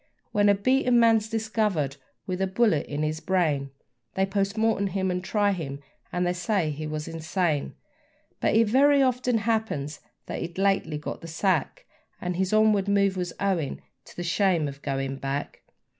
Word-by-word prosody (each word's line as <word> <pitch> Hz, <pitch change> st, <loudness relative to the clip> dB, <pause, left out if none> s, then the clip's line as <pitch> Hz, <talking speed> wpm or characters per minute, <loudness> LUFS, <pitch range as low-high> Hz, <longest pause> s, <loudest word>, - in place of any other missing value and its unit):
When 205 Hz, -1 st, +3 dB
a 200 Hz, -, +5 dB
beaten 250 Hz, +3 st, +3 dB
man's 225 Hz, -2 st, +4 dB
discovered 215 Hz, -, -1 dB, 0.3 s
with 185 Hz, 0 st, -3 dB
a 190 Hz, -, +2 dB
bullet 190 Hz, -6 st, +2 dB
in 145 Hz, +1 st, -3 dB
his 155 Hz, +1 st, -1 dB
brain, 160 Hz, -7 st, 0 dB, 0.5 s
They 190 Hz, -, +2 dB
POST 195 Hz, +1 st, -1 dB
MORTEM 220 Hz, -2 st, +2 dB
him, 190 Hz, -1 st, -1 dB
and 180 Hz, 0 st, -2 dB
try 205 Hz, +1 st, +1 dB
him, 145 Hz, -7 st, -4 dB, 0.3 s
and 180 Hz, 0 st, 0 dB
they 175 Hz, -, +1 dB
say 180 Hz, -2 st, 0 dB
he 155 Hz, +1 st, -5 dB
was 155 Hz, 0 st, -4 dB
insane; 165 Hz, -2 st, -1 dB, 0.6 s
But -, -, +1 dB
it 225 Hz, 0 st, +5 dB
very 275 Hz, +4 st, +5 dB
often 250 Hz, -2 st, +1 dB
happens 215 Hz, -10 st, -1 dB, 0.3 s
that -, -, -5 dB
he'd 170 Hz, +1 st, -6 dB
lately 195 Hz, -5 st, +1 dB
got 150 Hz, -, -6 dB
the 165 Hz, -, -8 dB
sack, 195 Hz, -, -1 dB, 0.3 s
And 180 Hz, 0 st, -3 dB
his 190 Hz, +1 st, 0 dB
onward 215 Hz, -2 st, +3 dB
move 200 Hz, -1 st, +2 dB
was 180 Hz, -2 st, -3 dB
owing 185 Hz, -8 st, -1 dB, 0.3 s
to -, -, -15 dB
the 175 Hz, -, -4 dB
shame 175 Hz, -3 st, +2 dB
of 140 Hz, 0 st, -8 dB
going 135 Hz, -1 st, -2 dB
back. 135 Hz, +1 st, -4 dB
190 Hz, 175 wpm, -26 LUFS, 155-215 Hz, 0.6 s, a